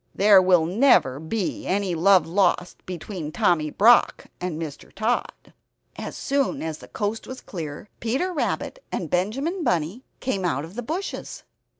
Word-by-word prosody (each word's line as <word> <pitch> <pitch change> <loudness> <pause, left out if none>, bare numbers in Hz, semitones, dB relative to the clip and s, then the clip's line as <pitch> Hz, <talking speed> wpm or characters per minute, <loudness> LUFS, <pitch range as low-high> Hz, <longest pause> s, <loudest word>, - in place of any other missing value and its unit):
There 200 -1 +7
will 180 -3 +4
never 180 - +3
be 180 +5 -3
any 190 0 0
love 185 +3 +5
lost 180 0 0
between 175 -3 -6
Tommy 155 -2 +2
Brock 230 +9 +4 0.2
and 180 -3 -3
Mr. 155 -4 -7
Tod. 220 +4 -2 0.4
As - - -6
soon 275 - 0
as 160 -1 -4
the - - -12
coast 210 +1 -3
was 260 0 -7
clear, 160 -1 -7
Peter 270 +11 -1
Rabbit - - -2
and 165 -5 -4
Benjamin 270 - -1
Bunny 180 - -1 0.2
came 200 -8 -2
out 155 -4 -1
of 165 - -12
the 245 - -4
bushes. 330 - -5
190 Hz, 155 wpm, -24 LUFS, 165-240 Hz, 0.4 s, There